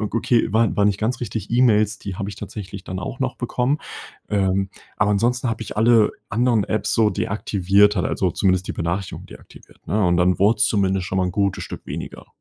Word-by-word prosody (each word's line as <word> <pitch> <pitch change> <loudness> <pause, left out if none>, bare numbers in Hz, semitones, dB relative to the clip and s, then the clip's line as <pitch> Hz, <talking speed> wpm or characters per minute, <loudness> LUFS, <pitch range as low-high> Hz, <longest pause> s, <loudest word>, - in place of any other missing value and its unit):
okay, 115 +3 +1
wa 115 +1 +4
war 105 - +2
nicht 100 -1 +1
ganz 120 +3 -1
richtig. 110 -3 -5
E-Mails, 110 -3 +3
die 100 -3 -6
habe 100 +1 -4
ich 100 - -6
tatsächlich 100 -1 -8
dann 90 +1 -6
auch 90 - -6
noch - - -1
bekommen. 135 +5 -1 0.5
Ähm, 95 -1 0 0.3
aber 105 0 +2
ansonsten 120 +5 +1
habe 115 0 -3
ich 105 - -8
alle 110 0 +4 0.2
anderen 115 -1 +2
Apps 110 - -1
so 110 -2 +3
deaktiviert 100 0 +2
halt, 90 - 0
also 90 -3 -1
zumindest 95 0 +1
die - - -3
Benachrichtigung 85 +3 -3
deaktiviert, - - -16
ne? 105 0 +1
Und 90 -1 +3
dann 90 +1 +3
wurd's 105 +2 +4
zumindest 95 -3 0
schon 95 - -2
mal 95 - +2
'n - - -2
gutes 100 +1 -1
Stück - - -8
weniger. - - -7
105 Hz, 205 wpm, -22 LUFS, 95-115 Hz, 0.5 s, wa